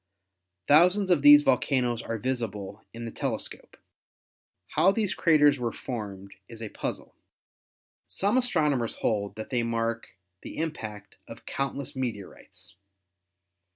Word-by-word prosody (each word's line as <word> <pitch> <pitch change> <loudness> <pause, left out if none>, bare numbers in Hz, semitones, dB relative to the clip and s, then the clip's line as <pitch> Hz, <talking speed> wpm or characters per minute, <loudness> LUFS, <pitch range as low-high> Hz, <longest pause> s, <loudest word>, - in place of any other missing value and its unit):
Thousands 180 +6 +5
of 170 -5 +4
these 145 0 +9
volcanoes 125 -3 +1
are 115 - -4
visible 105 -4 -4
in 115 0 -7
the 115 - -5
telescope. - - -5 0.9
How 190 - +4
these 205 -2 -1
craters 150 -4 +4
were 120 -2 -1
formed 100 -5 -7 0.2
is 115 - -10
a 110 -2 -6
puzzle. - - -5 0.9
Some 200 +4 0
astronomers 150 - +1
hold 100 -3 -1
that 110 +4 -8
they 125 -2 +1
mark 115 0 -2 0.3
the - - -9
im 160 0 -1
pact 105 -7 -9
of - - -11
countless 140 +1 -3
meteorites. 115 -10 -7
125 Hz, 125 wpm, -27 LUFS, 110-150 Hz, 0.9 s, these